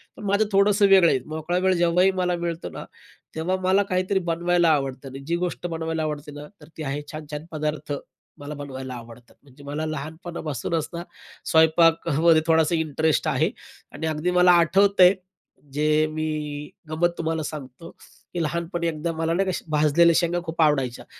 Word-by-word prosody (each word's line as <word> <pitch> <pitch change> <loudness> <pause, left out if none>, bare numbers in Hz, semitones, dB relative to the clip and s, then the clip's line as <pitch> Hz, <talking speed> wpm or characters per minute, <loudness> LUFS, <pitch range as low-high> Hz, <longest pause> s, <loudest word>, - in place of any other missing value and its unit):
पण - - -11
माझं 200 +2 +2
थोडंसं 200 +1 +4
वेगळं 190 -3 +6
आहे. 130 - +2
मोकळा 160 +3 -3
वेळ 190 - +4
जेव्हाही 175 +2 +3
मला 180 -1 +1
मिळतो 170 0 -3
ना, - - -8 0.5
तेव्हा 165 +4 -1
मला 190 +2 +3
काहीतरी 185 +1 +1
बनवायला 175 0 +2
आवडतं 135 -3 -1
आणि 135 +1 -9
जी 170 - +1
गोष्ट 175 0 -3
बनवायला 160 -1 -3
आवडते 150 -1 -4
ना 145 0 -9 0.2
तर 150 - -14
ती 160 - -5
आहे 145 +1 -3
छान-छान 155 0 -7
पदार्थ. 150 -1 -3 0.5
मला 145 +1 -7
बनवायला 130 -2 -7
आवडतात. 120 0 -13
म्हणजे 140 0 -17
मला 145 +2 -4
लहानपणापासूनच 155 0 -4
ना, 170 0 -5 0.4
स्वयंपाकामध्ये 160 0 +4
थोडासा 160 +1 +3
इंटरेस्ट 160 -1 0
आहे - - +1 0.4
आणि 160 - -4
अगदी 155 +3 -1
मला 180 0 +7
आठवतंय, 185 +2 +5 0.6
जे 155 +1 +2
मी 150 -1 -4 0.2
अ, - - -5
गंमत 175 +2 +2
तुम्हाला 160 -1 -2
सांगतो, 150 +1 -8 0.4
की 175 - -1
लहानपणी 170 +2 -2
एकदा 165 +1 -2
मला 165 +1 -1
नाही 190 +2 +1
का - - -4
भाजलेल्या 155 +3 +4
शेंगा 175 0 +1
खूप 165 0 -2
आवडायच्या, 135 -6 +1
160 Hz, 165 wpm, -24 LUFS, 150-175 Hz, 0.6 s, मला